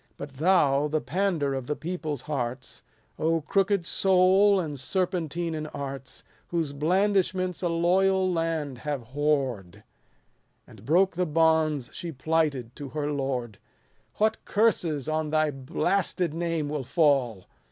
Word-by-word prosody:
But 140 Hz, -2 st, -9 dB
thou, 150 Hz, -4 st, +3 dB
the 155 Hz, +1 st, 0 dB
pauder 170 Hz, -5 st, -1 dB
of 130 Hz, -2 st, -4 dB
the 150 Hz, -, -1 dB
people's 155 Hz, -5 st, -4 dB
hearts, 125 Hz, -3 st, -4 dB, 0.6 s
crooked 195 Hz, 0 st, +1 dB
soul, 190 Hz, +2 st, +4 dB
and 150 Hz, -6 st, -4 dB
serpentine 175 Hz, +1 st, -2 dB
in 155 Hz, -1 st, -4 dB
arts, 135 Hz, -3 st, -7 dB, 0.2 s
Whose 165 Hz, -5 st, -2 dB
blandishments 185 Hz, +3 st, +1 dB
a 175 Hz, -, 0 dB
loyal 185 Hz, +2 st, +2 dB
land 160 Hz, -6 st, -2 dB
have 140 Hz, -5 st, -4 dB
whored, 135 Hz, -10 st, -1 dB, 0.8 s
And 100 Hz, -, -16 dB
broke 185 Hz, +7 st, +3 dB
the 180 Hz, +1 st, 0 dB
bonds 155 Hz, -4 st, +2 dB
she 170 Hz, -, -6 dB
plighted 145 Hz, -4 st, -1 dB
to 145 Hz, -2 st, -7 dB
her 150 Hz, +1 st, -3 dB
lord; 130 Hz, -7 st, -3 dB, 0.6 s
What 220 Hz, +1 st, 0 dB
curses 170 Hz, -, +1 dB
on 155 Hz, 0 st, -1 dB
thy 155 Hz, 0 st, +2 dB
blasted 170 Hz, +5 st, -1 dB
name 165 Hz, -2 st, -2 dB
will 145 Hz, -2 st, -3 dB
fall 130 Hz, -, +1 dB
155 Hz, 130 wpm, -26 LUFS, 140-180 Hz, 0.8 s, soul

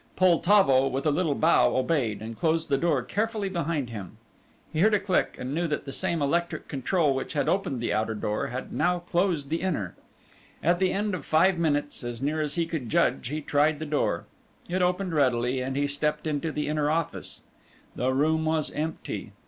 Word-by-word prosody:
Poltavo, 175 Hz, -6 st, +4 dB
with 135 Hz, +2 st, -2 dB
a 155 Hz, -, +4 dB
little 155 Hz, -1 st, +1 dB
bow, 160 Hz, +4 st, +4 dB
obeyed, 130 Hz, -7 st, 0 dB
and 115 Hz, +1 st, -6 dB
closed 160 Hz, +3 st, 0 dB
the 140 Hz, -, +3 dB
door 150 Hz, -6 st, +1 dB
carefully 215 Hz, -, -1 dB
behind 165 Hz, -8 st, -2 dB
him. 100 Hz, -5 st, -8 dB, 0.6 s
He 155 Hz, -, -1 dB
heard 210 Hz, +4 st, +5 dB
a -, -, +2 dB
click, 190 Hz, -2 st, 0 dB
and 130 Hz, +2 st, -4 dB
knew 170 Hz, +2 st, 0 dB
that 150 Hz, -3 st, -3 dB
the 135 Hz, -, -5 dB
same 170 Hz, -1 st, -1 dB
electric 170 Hz, +2 st, -1 dB
control 145 Hz, +2 st, +1 dB
which 135 Hz, -, -4 dB
had 145 Hz, -, 0 dB
opened 185 Hz, -10 st, 0 dB
the 115 Hz, -, -1 dB
outer 110 Hz, +1 st, 0 dB
door 105 Hz, 0 st, -2 dB
had 125 Hz, +2 st, -6 dB
now 180 Hz, 0 st, +2 dB
closed 175 Hz, -4 st, -1 dB
the 165 Hz, +2 st, -1 dB
inner. 145 Hz, -, -2 dB, 0.7 s
At 175 Hz, +1 st, +3 dB
the 185 Hz, -1 st, +2 dB
end 205 Hz, +1 st, -1 dB
of 185 Hz, -, -4 dB
five 170 Hz, +3 st, +3 dB
minutes, 145 Hz, -4 st, 0 dB
as 120 Hz, -1 st, -5 dB
near 150 Hz, +4 st, -1 dB
as 150 Hz, -1 st, -2 dB
he 170 Hz, -1 st, +1 dB
could 160 Hz, -8 st, -4 dB
judge, -, -, +1 dB
he 150 Hz, +4 st, -3 dB
tried 150 Hz, +1 st, +2 dB
the 155 Hz, -, -5 dB
door. 150 Hz, -1 st, 0 dB, 0.4 s
It 185 Hz, +2 st, -1 dB
opened 180 Hz, 0 st, 0 dB
readily 130 Hz, -3 st, +2 dB
and 130 Hz, +1 st, -3 dB
he 145 Hz, +1 st, +1 dB
stepped 150 Hz, +2 st, -1 dB
into 155 Hz, +1 st, -1 dB
the 150 Hz, 0 st, -2 dB
inner 150 Hz, -1 st, 0 dB
office. 165 Hz, +1 st, -3 dB, 0.5 s
The 125 Hz, +1 st, 0 dB
room 155 Hz, +4 st, +2 dB
was 160 Hz, -1 st, 0 dB
empty. 160 Hz, +2 st, -4 dB
155 Hz, 200 wpm, -27 LUFS, 135-170 Hz, 0.7 s, heard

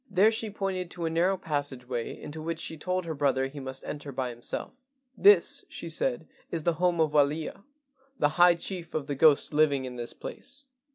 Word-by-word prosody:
There 200 Hz, +3 st, +5 dB
she 225 Hz, -1 st, -2 dB
pointed 195 Hz, -3 st, -3 dB
to 170 Hz, -1 st, -4 dB
a 165 Hz, -, -1 dB
narrow 180 Hz, +4 st, +2 dB
passage 145 Hz, -6 st, -3 dB
way 120 Hz, -2 st, -4 dB
into 155 Hz, +1 st, -7 dB
which 165 Hz, +1 st, -3 dB
she 160 Hz, -, -4 dB
told 180 Hz, +3 st, -2 dB
her 165 Hz, -, -3 dB
brother 135 Hz, -3 st, +1 dB
he 140 Hz, +2 st, -7 dB
must 130 Hz, 0 st, -6 dB
enter 145 Hz, -1 st, -6 dB
by 130 Hz, -1 st, -2 dB
himself. 120 Hz, -, -6 dB, 0.3 s
"This," 410 Hz, +1 st, +5 dB
she -, -, -6 dB
said, -, -, -1 dB, 0.2 s
"is 165 Hz, -2 st, -3 dB
the 170 Hz, -, +2 dB
home 175 Hz, -2 st, +2 dB
of 155 Hz, -2 st, +3 dB
Walia, 150 Hz, +4 st, +1 dB, 0.6 s
the 145 Hz, -, +3 dB
high 175 Hz, +2 st, +6 dB
chief 170 Hz, 0 st, -6 dB
of 155 Hz, -3 st, -1 dB
the 145 Hz, -, -3 dB
ghosts 150 Hz, +1 st, +4 dB
living 145 Hz, -3 st, +3 dB
in 125 Hz, -1 st, -7 dB
this 120 Hz, 0 st, -4 dB
place. 280 Hz, 0 st, -9 dB
155 Hz, 205 wpm, -28 LUFS, 140-180 Hz, 0.6 s, high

